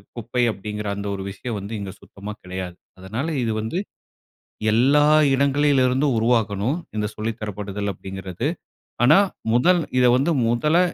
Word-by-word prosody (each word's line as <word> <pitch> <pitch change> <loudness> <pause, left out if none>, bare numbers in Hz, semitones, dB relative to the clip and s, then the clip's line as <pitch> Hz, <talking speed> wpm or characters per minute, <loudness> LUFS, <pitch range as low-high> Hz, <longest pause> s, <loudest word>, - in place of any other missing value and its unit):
குப்பை, 120 +2 -1
அப்படிங்கிற 105 0 -5
அந்த 100 0 -5
ஒரு 95 - -5
விஷயம் 110 +3 -5
வந்து 100 +3 -7
இங்க 100 -1 -5
சுத்தமா 100 +2 -9
கிடையாது. 90 -1 -6 0.2
அதனால 110 +11 -4 0.2
இது 115 - 0
வந்து 110 +11 -3 1.0
எல்லா 140 +6 +4 0.3
இடங்களிலிருந்தும் 140 -1 +2
உருவாகணும். 115 +2 +1 0.2
இந்த 105 0 0
சொல்லி 110 +1 -2
தரப்படுதல் 105 -1 -4
அப்படிங்கிறது. 95 +4 -6 0.6
ஆனா, 150 +6 +7 0.4
முதல் 175 +8 +4 0.2
இதை 125 -1 +5
வந்து 145 +6 +1 0.2
முதல்ல 150 +9 +2
115 Hz, 130 wpm, -23 LUFS, 100-135 Hz, 1.0 s, ஆனா